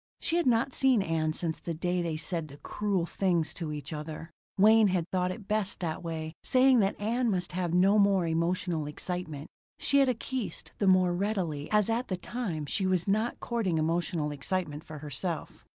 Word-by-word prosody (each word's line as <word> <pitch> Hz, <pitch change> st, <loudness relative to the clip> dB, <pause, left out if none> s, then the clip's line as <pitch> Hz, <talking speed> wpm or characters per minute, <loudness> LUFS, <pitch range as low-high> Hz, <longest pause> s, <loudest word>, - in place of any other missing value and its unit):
She 335 Hz, -, 0 dB
had 345 Hz, -, +1 dB
not 245 Hz, +2 st, +2 dB
seen 260 Hz, -6 st, +3 dB
Ann 160 Hz, -2 st, 0 dB
since 160 Hz, 0 st, -3 dB
the 170 Hz, -, -4 dB
day 175 Hz, +2 st, -1 dB
they 165 Hz, -2 st, -2 dB
said 165 Hz, 0 st, -2 dB
the 140 Hz, -1 st, -12 dB
cruel 200 Hz, +1 st, -1 dB
things 175 Hz, -3 st, 0 dB
to 165 Hz, -3 st, -5 dB
each 150 Hz, 0 st, -6 dB
other. 155 Hz, +2 st, -6 dB, 0.3 s
Wayne 215 Hz, +2 st, +6 dB
had 180 Hz, -3 st, 0 dB
thought 180 Hz, -1 st, +1 dB
it 200 Hz, +1 st, -7 dB
best 210 Hz, -2 st, -1 dB
that 160 Hz, -3 st, -3 dB
way, 160 Hz, -2 st, -4 dB
saying 260 Hz, -1 st, +5 dB
that 195 Hz, -1 st, +1 dB
Ann 235 Hz, +4 st, 0 dB
must 180 Hz, -3 st, -1 dB
have 175 Hz, -1 st, -2 dB
no 190 Hz, +4 st, +4 dB
more 200 Hz, -3 st, +4 dB
emotional 165 Hz, -1 st, 0 dB
excitement. 155 Hz, -1 st, -5 dB, 0.3 s
She 280 Hz, -, +3 dB
had 270 Hz, -2 st, +4 dB
acquiesced 255 Hz, -1 st, -4 dB
the 200 Hz, -, +2 dB
more 185 Hz, -1 st, +5 dB
readily 175 Hz, -6 st, -2 dB
as 210 Hz, -2 st, +3 dB
at 230 Hz, +3 st, 0 dB
the 185 Hz, -, -2 dB
time 180 Hz, -6 st, -4 dB
she 190 Hz, +6 st, 0 dB
was 185 Hz, -1 st, +1 dB
not 215 Hz, +4 st, 0 dB
courting 220 Hz, -8 st, -1 dB
emotional 160 Hz, -1 st, 0 dB
excitement 150 Hz, +1 st, -3 dB
for 155 Hz, -2 st, -9 dB
herself. 150 Hz, +3 st, -5 dB
180 Hz, 190 wpm, -29 LUFS, 160-210 Hz, 0.3 s, Wayne